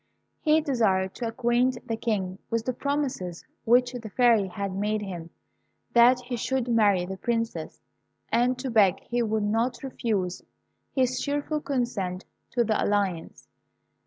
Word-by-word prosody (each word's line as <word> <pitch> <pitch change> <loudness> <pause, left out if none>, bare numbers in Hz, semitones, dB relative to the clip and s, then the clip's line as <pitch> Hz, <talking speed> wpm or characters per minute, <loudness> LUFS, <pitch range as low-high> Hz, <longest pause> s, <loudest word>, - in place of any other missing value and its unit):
He 310 0 +3
desired 205 - +1
to 240 - -4
acquaint 240 +1 0
the 225 - -1
King 195 -5 -2
with 230 -1 -1
the 255 - 0
promises 260 - -3 0.2
which 245 +2 +4
the 235 -3 -7
Fairy 230 -3 +4
had 200 0 -4
made 210 +2 -1
him, 175 -4 -6 0.6
that 245 +1 +6
he 245 0 -4
should 260 +1 -1
marry 205 -6 +3
the 190 +1 -6
Princess, 230 +2 -2 0.5
and 245 +1 +2
to 255 0 -4
beg 205 -5 +4
he 240 0 -2
would 220 -2 0
not 225 +6 0
refuse 210 -8 -2 0.5
his 255 -1 +1
cheerful 290 +1 -1
consent 210 -10 -2 0.2
to 240 - +1
the 220 -1 +1
alliance. 195 -5 -1
230 Hz, 145 wpm, -26 LUFS, 200-250 Hz, 0.6 s, that